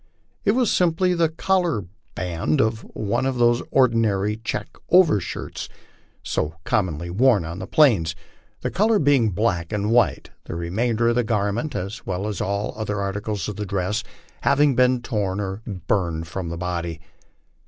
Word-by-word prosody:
"It 205 Hz, -, +4 dB
was 245 Hz, -2 st, +2 dB
simply 180 Hz, +1 st, +2 dB
the 170 Hz, -2 st, +2 dB
collar 170 Hz, -, 0 dB, 0.3 s
band 85 Hz, -3 st, -1 dB
of 110 Hz, 0 st, +2 dB, 0.2 s
one 115 Hz, +5 st, 0 dB
oi -, -, +2 dB
those 120 Hz, -1 st, +3 dB
ordinary 110 Hz, -5 st, +2 dB
check 115 Hz, -, -5 dB, 0.2 s
overshirts 165 Hz, -, +2 dB, 0.5 s
so 75 Hz, +2 st, -2 dB
commonly 85 Hz, -4 st, -1 dB
worn 110 Hz, -2 st, +3 dB
on 85 Hz, +3 st, -6 dB
the -, -, -6 dB
plains, 105 Hz, -, +4 dB, 0.5 s
the -, -, -2 dB
color 215 Hz, +3 st, +3 dB
being 140 Hz, -, +3 dB
black 90 Hz, -4 st, -1 dB
and 105 Hz, +1 st, -1 dB
white; 120 Hz, +1 st, +2 dB
the -, -, -6 dB
remainder 110 Hz, +7 st, 0 dB
of 120 Hz, -, +1 dB
the 125 Hz, -, +3 dB
garment, 110 Hz, +5 st, -1 dB
as 100 Hz, +5 st, -4 dB
well 95 Hz, +2 st, -3 dB
as 105 Hz, -4 st, -3 dB
all 100 Hz, +2 st, -1 dB
other 105 Hz, -1 st, -3 dB
articles 100 Hz, +1 st, -3 dB
of 105 Hz, -, -5 dB
dress, 100 Hz, +3 st, -1 dB, 0.4 s
having 140 Hz, -1 st, +3 dB
been 125 Hz, 0 st, +3 dB
torn 105 Hz, -6 st, -1 dB
or 95 Hz, +1 st, -4 dB
burned 85 Hz, -4 st, -1 dB
from 85 Hz, 0 st, -4 dB
the 85 Hz, -, -4 dB
body." 85 Hz, -2 st, -3 dB
105 Hz, 155 wpm, -23 LUFS, 95-125 Hz, 0.5 s, It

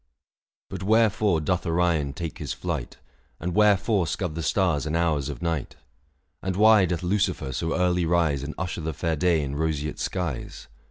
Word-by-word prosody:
But 95 Hz, -, -7 dB
wherefore 105 Hz, -4 st, +3 dB
doth 90 Hz, +3 st, 0 dB
Orion 80 Hz, -5 st, +1 dB
take 85 Hz, 0 st, -6 dB
his 75 Hz, -4 st, -3 dB
flight, -, -, -4 dB, 0.5 s
615 -, -, -8 dB
And 90 Hz, -, -2 dB
wherefore 105 Hz, -2 st, +3 dB
scud 90 Hz, -2 st, -2 dB
the 85 Hz, -, -4 dB
stars 80 Hz, -5 st, +1 dB
and 75 Hz, -, -1 dB
hours 75 Hz, -5 st, 0 dB
of 75 Hz, -, -6 dB
night? 80 Hz, -5 st, -2 dB, 0.7 s
And 95 Hz, -1 st, -2 dB
why 105 Hz, -1 st, +6 dB
doth 90 Hz, 0 st, -2 dB
Lucifer 90 Hz, -7 st, 0 dB
so 80 Hz, +6 st, -1 dB
early 90 Hz, -2 st, +1 dB
rise 80 Hz, -5 st, +2 dB
And 75 Hz, +2 st, -6 dB
usher 85 Hz, -1 st, -3 dB
the 80 Hz, 0 st, -3 dB
fair 80 Hz, +2 st, -1 dB
day 80 Hz, 0 st, +2 dB
in 70 Hz, 0 st, -4 dB
roseate 75 Hz, -1 st, -2 dB
skies 85 Hz, -8 st, -4 dB
85 Hz, 175 wpm, -25 LUFS, 75-95 Hz, 0.7 s, why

